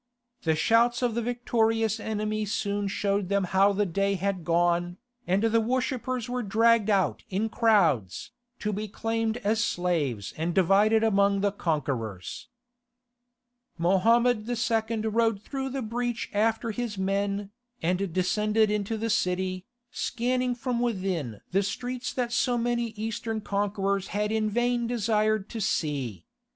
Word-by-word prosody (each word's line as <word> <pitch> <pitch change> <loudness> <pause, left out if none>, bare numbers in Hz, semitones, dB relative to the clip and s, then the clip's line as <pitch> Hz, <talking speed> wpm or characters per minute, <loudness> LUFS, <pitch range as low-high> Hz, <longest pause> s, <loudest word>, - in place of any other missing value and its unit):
The 160 -1 +1
shouts 235 +8 +3
of 240 -2 +1
the 235 - -1
victorious 225 -2 0
enemy 215 0 -2
soon 205 0 -1
showed 200 -1 -1
them 200 -1 +2
how 190 +2 +3
the 205 +1 +1
day 195 +2 0
had 190 -1 -2
gone, 175 +1 +1 0.3
and 190 +4 +2
the 225 0 +3
worshippers 255 0 -1
were 250 0 -2
dragged 225 +1 +3
out 195 -3 +1
in 205 +4 -1
crowds, 170 - +2 0.3
to 210 0 -1
be 210 +2 -3
claimed 225 +2 -1
as 220 +2 +2
slaves 155 - -1
and 165 +2 -2
divided 200 +4 +4
among 200 -2 +3
the 205 0 +2
conquerors. 130 - -3 1.3
Mohammed 220 +6 +3
II. 230 -1 0
rode 225 -1 +1
through 270 +5 -4
the 265 -1 -3
breach 240 +1 -3
after 225 +2 +1
his 225 -2 -4
men, 200 +1 -1 0.3
and 180 +2 0
descended 210 +4 +2
into 210 +1 -1
the 225 +1 -1
city, 185 0 -1 0.2
scanning 250 +1 -1
from 245 0 -2
within 185 - -2
the 195 +2 +3
streets 245 +5 -3
that 245 -2 -2
so 250 -1 +2
many 240 0 0
Eastern 225 +1 -3
conquerors 200 -1 -1
had 210 +1 -1
in 220 -1 +1
vain 240 +2 0
desired 215 -3 +1
to 225 - -5
see. 135 - -2
210 Hz, 140 wpm, -27 LUFS, 190-230 Hz, 1.3 s, divided